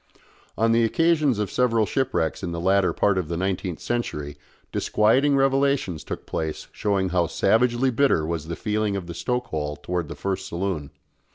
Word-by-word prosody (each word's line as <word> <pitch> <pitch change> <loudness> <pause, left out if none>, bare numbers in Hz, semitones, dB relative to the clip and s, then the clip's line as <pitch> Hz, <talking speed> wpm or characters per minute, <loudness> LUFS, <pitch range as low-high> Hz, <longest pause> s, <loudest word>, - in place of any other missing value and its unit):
On 115 +1 +3
the 115 0 +4
occasions 155 0 +2
of 105 -2 -2
several 115 -3 +2
shipwrecks 120 -10 -1
in 90 -3 -3
the 85 - -3
latter 95 +1 +3
part 100 -2 +2
of 90 - -3
the 85 +1 -3
nineteenth 95 -2 -2
century 75 -12 -3 0.4
disquieting 130 +7 +3
revelations 135 - +1
took - - -6
place 80 -1 -4
showing 100 -3 0
how 90 -1 +1
savagely 120 +8 +2
bitter 120 - +2
was 80 -1 -3
the 85 - -3
feeling 105 -1 -1
of 95 -3 -4
the 85 - -7
stoke 125 +7 -2
hole 75 -1 -3
towards 85 +1 -3
the - - -6
first 95 -1 -3
saloon. 85 -5 -3
100 Hz, 175 wpm, -24 LUFS, 85-120 Hz, 0.4 s, the